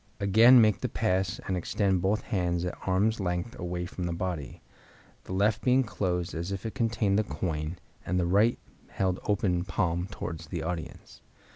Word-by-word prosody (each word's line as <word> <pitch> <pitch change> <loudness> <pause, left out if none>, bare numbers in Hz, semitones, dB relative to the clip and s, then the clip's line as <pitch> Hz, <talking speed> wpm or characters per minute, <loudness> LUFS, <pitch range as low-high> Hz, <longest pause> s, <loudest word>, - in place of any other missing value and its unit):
Again 115 +5 +7
make 110 -3 +4
the - - -1
pass 90 -1 0
and 95 - 0
extend 95 +1 0
both 100 +4 +1
hands 90 -3 -1
at 90 - -3
arm's 105 +5 +2
length 90 +4 -2
away 90 -1 -3
from 90 -1 -5
the 85 - -2
body, 85 -6 -4 0.6
the - - -9
left 105 +3 +2
being 130 +1 +4
closed 90 -6 -2
as 85 +4 -4
if 95 +1 -4
it 110 - -3
contained 110 -4 +1
the - - +2
coin, 80 -4 -3 0.3
and 90 +1 0
the 90 - +1
right 105 +7 +3 0.3
held 95 -1 -1
open 95 -4 +1
palm 90 -1 -1
towards 80 -5 -6
the - - -4
audience. 80 -2 -6
95 Hz, 175 wpm, -28 LUFS, 90-105 Hz, 0.6 s, Again